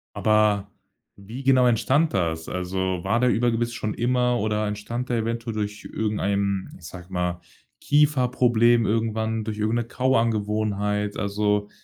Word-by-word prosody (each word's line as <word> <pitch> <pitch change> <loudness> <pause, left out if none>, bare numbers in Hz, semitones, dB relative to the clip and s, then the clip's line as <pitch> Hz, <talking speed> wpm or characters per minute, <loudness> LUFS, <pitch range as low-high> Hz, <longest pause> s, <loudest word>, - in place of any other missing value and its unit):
Aber 105 -2 +2 0.4
wie 110 +7 -9
genau 130 -1 +4
entstand 135 +7 +2
das? 80 -4 -1
Also 90 0 -2
war 115 - +1
der 125 0 +3
Überbiss 120 0 +1
schon 110 -2 -3
immer 125 0 +1
oder 105 0 -1
entstand 105 +4 -4
der 120 - +1
eventuell 115 0 -3
durch 105 -1 -4
irgendeinen, 100 -2 -1
ich 85 - -15
sage 90 +2 -11
mal, 90 -1 -2 0.4
Kieferproblem 125 -5 +3
irgendwann 110 0 -1
durch 105 -1 -5
irgend 110 +2 0
'ne 120 - 0
Kauangewohnheit? 105 -4 0
Also 105 0 0
110 Hz, 135 wpm, -24 LUFS, 100-120 Hz, 0.4 s, genau